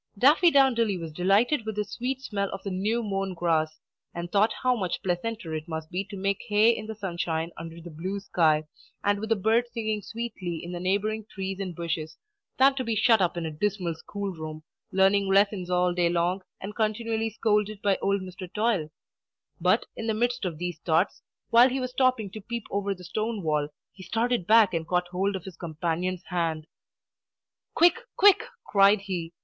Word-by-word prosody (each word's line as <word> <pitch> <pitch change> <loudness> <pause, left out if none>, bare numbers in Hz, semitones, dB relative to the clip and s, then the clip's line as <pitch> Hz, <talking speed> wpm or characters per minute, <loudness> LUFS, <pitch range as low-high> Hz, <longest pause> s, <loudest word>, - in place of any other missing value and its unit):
Daffydowndilly 265 - +4
was 165 -1 -6
delighted 200 - +2
with 220 -1 -4
the 210 - 0
sweet 260 +4 -4
smell 200 -5 -2
of 195 - -7
the 195 - -3
new 215 +6 0
mown 195 -2 -2
grass, 160 -2 0 0.4
and 170 0 -5
thought 210 +2 +3
how 255 0 +3
much 185 -6 -3
pleasanter 185 0 -2
it 155 +1 -4
must 160 0 -5
be 185 +2 -1
to 200 0 -8
make 195 +1 -1
hay 215 +1 +5
in 215 - -6
the 220 - -5
sunshine 170 -4 -2
under 165 0 -8
the 170 0 -10
blue 185 +6 -4
sky, 160 -6 +2 0.4
and 205 0 +2
with 220 +1 -5
the 225 - +4
birds 225 +4 +2
singing 220 -2 -2
sweetly 205 -6 -5
in 175 - -6
the 175 - -4
neighbouring 205 +4 0
trees 190 -1 -5
and 185 -3 -4
bushes, 160 -2 -4 0.4
than 270 +1 +6
to 265 -1 -3
be 230 -2 -1
shut 220 0 +4
up 175 -1 +1
in 170 - -2
a 160 - -3
dismal 180 +1 -1
school 200 +5 -5
room, 155 -2 -7 0.3
learning 195 +1 +3
lessons 195 -2 +3
all 180 0 +2
day 175 -1 +2
long, 175 +2 0 0.2
and 205 +2 -7
continually 225 0 0
scolded 210 -1 0
by 200 -1 +3
old 200 0 +1
Mr. 185 -1 -8
Toil. 210 -8 0 0.7
But, - - +3
in 225 - -5
the 220 - +1
midst 240 0 0
of 170 -4 -3
these 175 -1 -4
thoughts, 165 +3 +1 0.3
while 240 +3 +7
he 265 +1 -2
was 255 -1 -3
stopping 255 -5 +1
to 215 - -8
peep 235 +2 -5
over 200 0 -1
the 180 - -13
stone 215 +4 -3
wall, 150 -2 +1 0.3
he 185 - -13
started 225 +1 -1
back 220 -3 +6
and 165 -1 -2
caught 180 0 0
hold 195 +3 0
of 185 - -5
his 190 -4 -9
companion's 170 +2 -2
hand. 165 -3 -1 1.1
"Quick, 350 +7 +5 0.2
quick!" 410 +3 +6 0.2
cried 200 0 +5
he. 175 -4 -4
195 Hz, 195 wpm, -27 LUFS, 175-220 Hz, 1.1 s, while